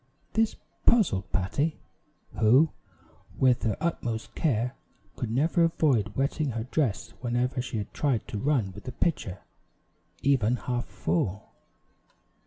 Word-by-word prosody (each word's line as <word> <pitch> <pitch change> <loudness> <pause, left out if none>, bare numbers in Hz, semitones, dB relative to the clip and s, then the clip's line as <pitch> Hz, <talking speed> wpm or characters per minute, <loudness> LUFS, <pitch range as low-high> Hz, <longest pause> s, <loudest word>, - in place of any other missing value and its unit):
This 220 0 +2 0.3
puzzled 175 - +3
Patty, 140 - 0 0.6
who, 130 +9 +5 0.7
with 130 -2 +4
her 110 -3 0
utmost 120 -9 -2
care, 125 -4 0 0.4
could 120 - -3
never 155 +8 +2
avoid 125 -11 +1
wetting 140 0 0
her 110 0 -2
dress 130 -3 -1
whenever 125 +1 0
she 125 -2 -4
had 105 - -5
tried 135 -7 0
to 105 - -3
run 125 -6 +1
with 95 - -12
the 130 - -5
pitcher, 100 - -1 0.8
even 125 -4 +3
half 125 -1 -2
full. 90 +5 -2
125 Hz, 125 wpm, -28 LUFS, 110-145 Hz, 0.8 s, who